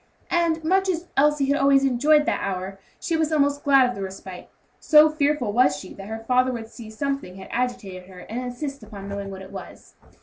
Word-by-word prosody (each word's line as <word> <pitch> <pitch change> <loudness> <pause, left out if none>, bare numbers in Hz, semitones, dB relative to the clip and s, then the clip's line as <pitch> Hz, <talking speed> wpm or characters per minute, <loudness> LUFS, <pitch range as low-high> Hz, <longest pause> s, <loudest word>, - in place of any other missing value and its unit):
And 335 -2 +1
much 380 +4 +2
as 350 -1 -2
Elsie 295 0 +3
had 280 +1 +1
always 275 0 +4
enjoyed 295 +4 +3
that - - -1
hour, 195 0 -4 0.2
she 335 - -2
was 320 -1 0
almost 285 -1 +1
glad 275 -3 +5
of 245 - -3
the 200 - -7
respite, 190 -1 -8 0.3
so 305 -1 +6
fearful 290 -7 0
was 230 -11 +4
she 185 +5 -10
that 195 - -10
her 225 +1 -7
papa 255 0 +3
would 225 -2 -6
see 225 -2 -11
that 220 - -13
something 275 -8 -3
had 190 - -11
agitated 200 -7 -3
her, 180 -1 -12
and 230 +6 -5
insist 275 +3 -5
upon 205 -2 -10
knowing 200 0 -5
what 190 -1 -8
it 190 - -12
was. 190 -2 -11
250 Hz, 215 wpm, -24 LUFS, 200-295 Hz, 0.3 s, so